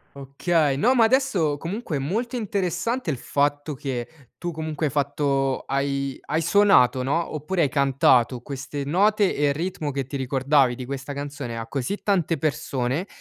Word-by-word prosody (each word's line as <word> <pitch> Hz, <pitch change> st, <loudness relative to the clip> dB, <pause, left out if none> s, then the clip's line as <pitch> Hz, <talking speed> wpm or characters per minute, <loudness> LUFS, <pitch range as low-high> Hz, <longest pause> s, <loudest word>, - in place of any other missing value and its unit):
Okay, 140 Hz, +2 st, 0 dB
no 235 Hz, -, +3 dB
ma 235 Hz, -3 st, +5 dB
adesso 220 Hz, -, +2 dB
comunque 170 Hz, +2 st, -4 dB
è -, -, 0 dB
molto 225 Hz, -, -2 dB
interessante 200 Hz, +1 st, -2 dB
il 150 Hz, -, 0 dB
fatto 145 Hz, +4 st, -1 dB
che 135 Hz, +1 st, -6 dB
tu 175 Hz, -, -4 dB
comunque 160 Hz, -1 st, -4 dB
hai 140 Hz, -, -2 dB
fatto 140 Hz, -1 st, 0 dB
hai 140 Hz, 0 st, -1 dB
hai 160 Hz, +2 st, 0 dB
suonato 175 Hz, -9 st, +4 dB
no, 155 Hz, +6 st, -1 dB
oppure 165 Hz, +4 st, -1 dB
hai 145 Hz, -, +2 dB
cantato 130 Hz, -3 st, +3 dB
queste 140 Hz, +1 st, -5 dB
note 200 Hz, +6 st, +2 dB
e 145 Hz, 0 st, +2 dB
il 140 Hz, -, +1 dB
ritmo 160 Hz, -1 st, -3 dB
che 135 Hz, -1 st, -2 dB
ti 135 Hz, +2 st, -5 dB
ricordavi 130 Hz, 0 st, +2 dB
di 125 Hz, -, -7 dB
questa 135 Hz, +2 st, -5 dB
canzone, 140 Hz, -4 st, -5 dB
a 115 Hz, 0 st, -5 dB
così 135 Hz, -, -2 dB
tante 180 Hz, -5 st, +1 dB
persone 140 Hz, 0 st, -1 dB
145 Hz, 170 wpm, -24 LUFS, 135-175 Hz, -, ma